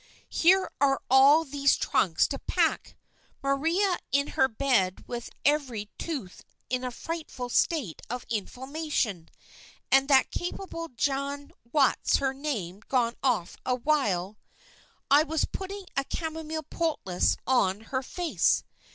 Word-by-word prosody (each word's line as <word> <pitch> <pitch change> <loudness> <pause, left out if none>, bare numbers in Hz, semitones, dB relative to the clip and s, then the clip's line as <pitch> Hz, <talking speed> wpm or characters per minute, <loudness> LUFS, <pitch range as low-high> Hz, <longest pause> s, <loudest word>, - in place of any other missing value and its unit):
Here 375 +3 +4
are 275 -2 +3
all 280 +5 +7
these 280 -1 +2
trunks 165 -4 +2
to 275 - -3
pack, - - 0 0.5
Maria 330 +8 +1
in 280 +2 +2
her 265 - +3
bed 220 -7 +1
with 240 -1 -5 0.2
every 260 -8 0
tooth 270 - -5 0.3
in 255 0 0
a 250 - -1
frightful 265 -2 -6
state 245 - 0
of 245 +1 -4
inflammation, 245 - -3 0.6
and 270 0 +5
that 270 -2 +4
capable 350 -2 -5
Jane 280 +2 -2 0.2
What's 285 -3 +3
her 270 -1 0
name 220 - -4
gone 240 -3 +1
off 225 -10 0 0.3
while 210 -10 +1 0.7
I 285 +2 +8
was 315 0 0
putting 390 +1 -6
a 275 - +1
chamomile 320 -1 -4
poultice 300 - 0
on 210 -6 +2
her 260 +3 -3
face. 345 +5 +1
275 Hz, 125 wpm, -28 LUFS, 235-310 Hz, 0.7 s, I